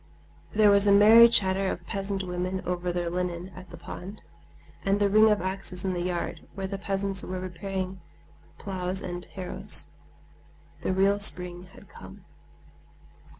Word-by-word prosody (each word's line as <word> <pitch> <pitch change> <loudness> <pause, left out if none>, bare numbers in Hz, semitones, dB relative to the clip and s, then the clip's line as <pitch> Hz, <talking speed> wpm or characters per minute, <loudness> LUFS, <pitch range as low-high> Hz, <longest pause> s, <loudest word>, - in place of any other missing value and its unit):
There 210 -1 +4
was 200 0 +4
a - - +5
merry 220 +4 +8
chatter 190 -3 +1
of 170 - -7
peasant 195 0 -4
women 185 +1 -4
over 180 0 -3
their 175 -1 -3
linen 180 0 -4
at 185 0 -13
the 170 - -11
pond, 185 +4 -9 0.6
and 195 +1 +1
the 205 - +2
ring 215 +1 +5
of 210 -4 +1
axes 190 -1 -5
in 190 - -1
the 175 - -3
yard, 175 -1 -4
where 195 -1 -5
the 195 +1 -5
peasants 195 -1 -2
were 185 0 -5
repairing 185 +1 -6 0.6
ploughs 190 -1 -4
and 175 0 -6
harrows. 185 -1 +3 0.9
The - - -2
real 195 +2 +2
spring 180 -3 +2
had - - -16
come. - - -14
190 Hz, 155 wpm, -26 LUFS, 180-200 Hz, 0.9 s, merry